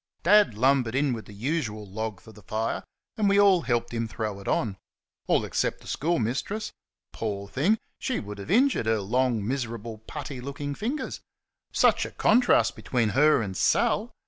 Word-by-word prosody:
Dad 205 - +5
lumbered 130 0 +2
in 140 -1 +2
the 110 -3 -7
usual 110 -1 -3
log 110 0 -4
for 110 - -15
the 105 -1 -15
fire, 110 +3 -2 0.3
and 210 -2 +2
we 200 0 +4
all 195 -3 +6
helped 120 -4 -1
him 115 -1 -1
throw 110 -2 -4
it 100 - -11
on 100 -5 0 0.5
all - - +2
except - - -1
the - - -18
schoolmistress. 165 - -1 0.4
Poor 100 -3 -4
thing! 165 - +2 0.2
She 260 - -1
would 105 -1 -8
have 100 - -8
injured 245 - +3
her 110 -1 +2
long, 115 +1 0
miserable, 115 -4 -4
putty 135 +2 -7
looking 145 +2 -5
fingers! 240 - -3 0.5
Such - - +3
a - - -11
contrast 245 +3 +3
between 120 -4 0
her 145 +1 +4
and 95 -2 -5
Sal! - - +2
120 Hz, 170 wpm, -26 LUFS, 110-155 Hz, 0.5 s, all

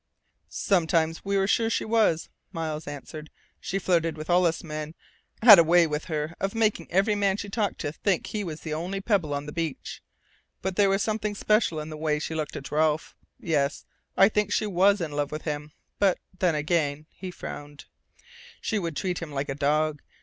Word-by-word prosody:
"Sometimes 165 -3 +1
we 200 0 0
were 195 - +2
sure 225 +3 +2
she - - -1
was," 215 -7 +2 0.2
Miles 160 -3 -4
answered. 150 +2 -8 0.3
"She 195 - -3
flirted 165 -4 +1
with 155 +3 -4
all 180 +1 +4
of - - +4
us 160 - -5
men 155 0 -6 0.5
had 210 -6 +11
a - - +7
way 170 +1 +5
with 150 -1 -3
her 155 -1 -3
of 195 +3 -2
making 220 -2 0
every 195 +4 +3
man 200 -1 +1
she 205 - -5
talked 210 0 -1
to 145 - -2
think 185 +3 0
he 210 -1 -3
was 160 -4 -6
the 155 - -4
only 180 +5 -3
pebble 195 -7 0
on 145 0 -2
the 150 - -6
beach. 165 -2 -4 0.6
But 190 -1 -2
there 200 0 +4
was 195 +1 +2
something 215 -1 -2
special 210 -6 +2
in 155 +1 -6
the 155 - -6
way 150 -1 0
she 160 - -4
looked 155 -2 -3
at 135 -2 -7
Ralph.... 155 0 +1 0.2
Yes, 145 -3 -1 0.3
I 195 - +8
think 210 -1 0
she 215 - +1
was 200 0 +3
in 160 -3 -3
love 145 -1 -2
with 155 +1 -5
him! 150 -1 -4 0.3
But 195 -3 +3 0.2
then 175 -4 +2
again," 150 -1 0
he 185 - -8
frowned, 145 -4 -8 0.7
"she 220 - -1
would 165 -5 -4
treat 180 -3 -2
him 165 -3 -6
like 140 0 -3
a - - -1
dog. 150 +1 0
165 Hz, 205 wpm, -26 LUFS, 150-195 Hz, 0.7 s, had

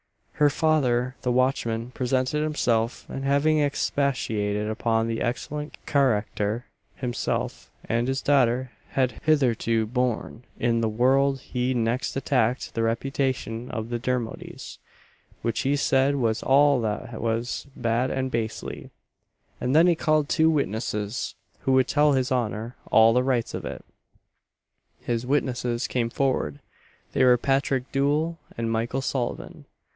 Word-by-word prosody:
Her 150 -1 +4
father, 130 -5 +1
the 125 - 0
watchman, 120 -2 0
presented 130 +3 0
himself; 120 -7 0
and 135 - -5
having 145 +3 +3
expatiated 110 -8 0
upon 115 +1 0
the 115 0 -2
excellent 150 +5 -3
carackter 115 -4 +1 0.3
himself 120 -2 -3 0.2
and 115 +2 0
his 135 +1 -1
daughter 130 -3 +2 0.2
had 130 -4 0
hitherto 120 -7 +2
borne 120 -1 -2 0.2
in 115 -1 +1
the 110 - +1
world 135 +4 +2
he 125 0 -1
next 120 +2 -1
attacked 130 -3 0
the 115 - -1
reputation 125 0 -1
of 110 0 -4
the 120 0 -2
Dermodys; 125 -2 -4 0.6
which 115 -1 -1
he 140 +2 +1
said 140 0 +2
was 115 -5 0
all 140 -1 +4
that 110 +1 -3
was 115 +4 -2
"bad 120 +3 0
and 130 0 -2
bastely;" 115 -2 -4 0.7
and 130 +3 0
then 165 +2 +7
he 175 - +5
called 155 -2 +1
two 160 +1 +3
witnesses, 110 -6 -2 0.2
who 135 - 0
would 130 -1 +4
tell 150 0 +3
his 130 -1 0
honour 115 -1 -1
"all 110 +1 +6
the 125 - +3
rights 125 -3 0
of - - -5
it." - - -7 1.1
His 120 0 -2
witnesses 125 -4 0
came 120 -2 -1
forward; 120 - 0 0.6
they - - +3
were 125 -1 +6
Patrick 135 0 0
Doole 150 +4 +1 0.2
and 115 -1 -1
Michael 115 +4 -1
Sullivan. 130 -3 -3
125 Hz, 135 wpm, -25 LUFS, 115-135 Hz, 1.1 s, then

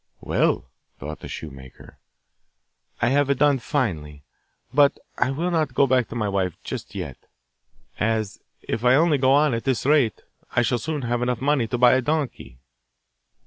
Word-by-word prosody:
'Well,' - - 0 0.3
thought 75 +2 -7
the - - -9
shoemaker, 65 -4 -10 1.0
'I - - +4
have 140 0 +2
done 145 -1 +3
finely. 80 - -3 0.5
But 145 0 +4 0.2
I 125 - +2
will 165 +7 -2
not 160 -3 0
go 140 - +5
back 125 -3 +2
to - - -9
my 110 -3 -1
wife 95 -4 -1
just 90 - -7
yet, 80 -10 -5 0.8
as, 110 -1 -1 0.2
if 115 - -3
I 125 +1 +5
only 155 -1 +3
go 130 0 +3
on 145 -1 +3
at 115 - -2
this 130 -3 -1
rate, 140 -7 +2 0.3
I 120 - +4
shall 120 +2 0
soon 150 +1 -3
have 120 0 -1
enough 125 -1 -1
money 135 -3 +1
to 120 - -2
buy 125 0 +6
a 130 - +3
donkey. 140 - -3
125 Hz, 170 wpm, -23 LUFS, 105-140 Hz, 1.0 s, buy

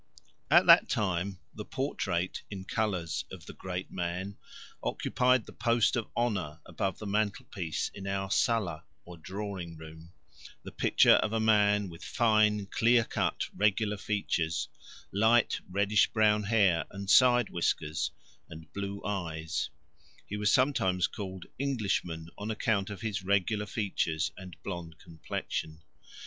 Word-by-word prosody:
At - - +6
that - - +7
time 95 -1 -1 0.2
the 105 - -6
portrait, 95 -9 -2
in 95 -2 -7
colours, 95 -8 -1
of - - -10
the - - -9
great 90 0 -5
man 90 +3 -3 0.5
occupied 125 -2 +1
the - - -12
post 115 -1 +2
of 120 -3 -2
honour 100 -11 -1
above 95 -3 -2
the 110 - -8
mantelpiece 100 -5 -2
in 100 -1 -8
our 95 0 -2
sala, 100 -12 +1 0.2
or 90 - -10
drawing 95 -2 -6
room 80 +1 -12 0.5
the - - -8
picture - - +5
of 110 - 0
a 115 - +1
man 105 -2 +3
with 85 -2 -11
fine 110 -3 +2
clear 115 +4 +3
cut - - -1
regular 105 +1 +2
features, 85 -7 -1 0.4
light 110 +4 +3
reddish 100 +2 +3
brown 105 -1 +2
hair 100 -6 +3
and 100 0 -7
side 120 +1 +5
whiskers, 80 -2 -1 0.4
and 80 0 -11
blue 100 0 -5
eyes; 80 -5 -2 0.6
he 105 - -5
was 105 -1 +2
sometimes 95 -9 +2
called 95 -3 -6
"Englishman" 100 -11 -1
on 105 +2 -4
account 105 -2 0
of 105 0 -7
his 105 -3 -2
regular 100 +2 +1
features 80 -9 -1
and 90 -2 -10
blonde 85 -4 -6
complexion. 80 -1 -5
100 Hz, 135 wpm, -30 LUFS, 90-110 Hz, 0.6 s, that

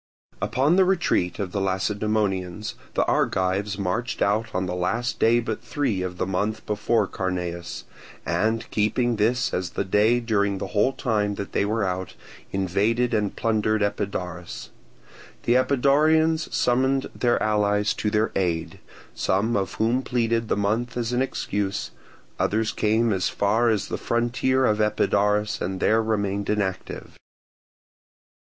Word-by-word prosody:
Upon 145 +7 +2
the 190 - +6
retreat 170 - +1
of 100 -4 -3
the 100 - -2
Lacedaemonians 100 0 -1 0.2
the - - +2
Argives 100 +2 0
marched 105 +6 -1
out 105 +3 +1
on 95 +1 -1
the 90 - -3
last 95 +7 -1
day 115 +1 +4
but 115 -2 -3
three 130 -10 -1
of 90 -1 -4
the 95 - -1
month 100 +4 -2
before 105 +1 +1
Carneus, 90 -3 -4 0.4
and 110 +1 0
keeping 115 +3 +1
this 120 +4 +1
as 90 -1 -1
the - - -3
day 105 +5 +3
during 100 -4 0
the - - -5
whole 105 +6 +2
time 105 -6 0
that 100 - -6
they - - +1
were 110 +1 0
out, 95 0 -3 0.4
invaded 105 +6 +1
and 105 -2 0
plundered 110 -1 +1
Epidaurus. 90 -4 -4 0.7
The 120 - +2
Epidaurians 150 +5 +3
summoned 130 +2 +1
their 120 -1 +1
allies 105 -1 +2
to 105 - -1
their 105 +1 +1
aid, 85 -4 -1 0.3
some 100 +5 0
of 95 -1 -1
whom 115 +4 +1
pleaded 115 -3 0
the - - 0
month 110 +5 -1
as 120 0 -2
an 125 - +1
excuse; 100 -6 -2 0.5
others 110 +1 +1
came 110 +1 +1
as 95 -1 0
far 110 +4 +2
as 105 -3 0
the - - -4
frontier 125 +3 +1
of 105 -2 +2
Epidaurus 105 0 +1
and 95 +1 -2
there 110 +3 +3
remained 100 -2 -1
inactive. 100 -3 -3
105 Hz, 145 wpm, -24 LUFS, 100-120 Hz, 0.7 s, the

